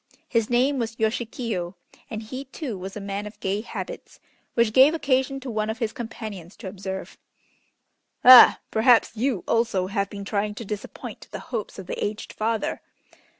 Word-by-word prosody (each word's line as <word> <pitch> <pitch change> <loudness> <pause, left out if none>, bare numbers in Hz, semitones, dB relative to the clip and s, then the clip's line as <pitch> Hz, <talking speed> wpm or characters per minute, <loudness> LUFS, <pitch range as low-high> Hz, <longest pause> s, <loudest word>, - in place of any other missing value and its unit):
His 230 -3 +1
name 260 +3 +2
was 225 -1 -3
Yoshikiyo, 220 -5 -2 0.3
and 220 0 -5
he, 255 +5 -7
too, 265 -3 -5
was 190 +2 -7
a - - -4
man 200 +1 -4
of 210 - -12
gay 195 +2 -1
habits, - - -7 0.4
which 235 -2 +3
gave 270 +6 +7
occasion 270 -3 +1
to 260 -2 -5
one 215 -1 -1
of 220 - -3
his 230 -3 -2
companions 220 - -7
to 215 - -9
observe: 190 0 -6 1.1
"Ah! 255 0 +10
perhaps 230 +1 +4
you 230 -4 0
also 225 -5 +1
have 200 0 -1
been 200 -1 -7
trying 210 0 -1
to 230 - -7
disappoint 210 0 -7
the - - -6 0.2
hopes 220 -3 -3
of 190 - -7
the - - -4
aged 210 +1 -4
father." 220 0 -1
220 Hz, 170 wpm, -25 LUFS, 200-240 Hz, 1.1 s, Ah